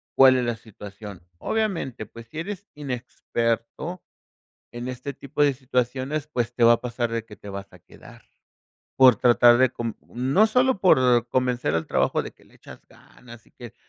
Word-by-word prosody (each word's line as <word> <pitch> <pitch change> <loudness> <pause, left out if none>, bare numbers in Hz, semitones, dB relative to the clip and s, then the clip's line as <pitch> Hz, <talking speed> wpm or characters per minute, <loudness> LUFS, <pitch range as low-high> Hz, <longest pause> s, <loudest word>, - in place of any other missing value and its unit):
¿cuál 130 -1 +7
es 125 - 0
la 120 -1 -1
situación? 105 -3 -11 0.2
Obviamente, 175 - -2
pues 115 +2 -13
si 155 - -8
eres 200 +3 -6
inexperto 125 +3 -4 0.7
en 120 +1 -6
este 130 +2 -6
tipo 140 +3 -3
de 145 -2 +3
situaciones, 130 +3 -2
pues 120 -5 -3
te 120 - -2
va 115 - +8
a - - -4
pasar 120 -1 -3
de 115 -1 -3
que 105 -2 -14
te 105 - -12
vas 100 0 -8
a - - -15
quedar, - - -17 0.8
por 130 -3 +7
tratar 120 +1 +5
de 130 0 +4
con 115 -2 -5
no 135 - +2
solo 250 +2 +2
por 125 - +4
convencer 125 -1 0
al 80 0 -1
trabajo - - +1
de - - -8
que - - -25
le - - -24
echas - - -14
ganas 120 -2 -16
y - - -26
que 120 -3 -12
125 Hz, 180 wpm, -24 LUFS, 115-140 Hz, 0.8 s, va